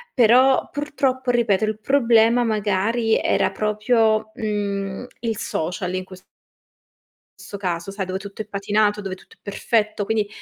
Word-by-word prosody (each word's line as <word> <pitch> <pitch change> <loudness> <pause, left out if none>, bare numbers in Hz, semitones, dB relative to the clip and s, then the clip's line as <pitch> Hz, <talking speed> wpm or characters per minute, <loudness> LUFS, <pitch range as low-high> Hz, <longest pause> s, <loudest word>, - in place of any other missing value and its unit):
Però, 255 +2 +5
purtroppo 270 -3 -1
ripeto, 220 -4 +2
il 215 0 -2
problema 235 -1 +3
magari 220 +2 +1
era - - +1
proprio, 215 0 +1
mhmm, 200 0 -3
il 225 -3 -2
social 180 +3 -3
in 185 0 -3
ques 185 0 -13 1.2
sto 190 +2 -8
caso, 180 -1 -3
sai 195 -1 -4
dove 185 +1 -3
tutto 200 +2 -8
è - - -6
patinato, 210 +1 0
dove 195 -2 -5
tutto - - -19
è - - -43
perfetto. 210 0 -1
Quindi 215 -1 0
215 Hz, 145 wpm, -22 LUFS, 195-230 Hz, 1.2 s, Però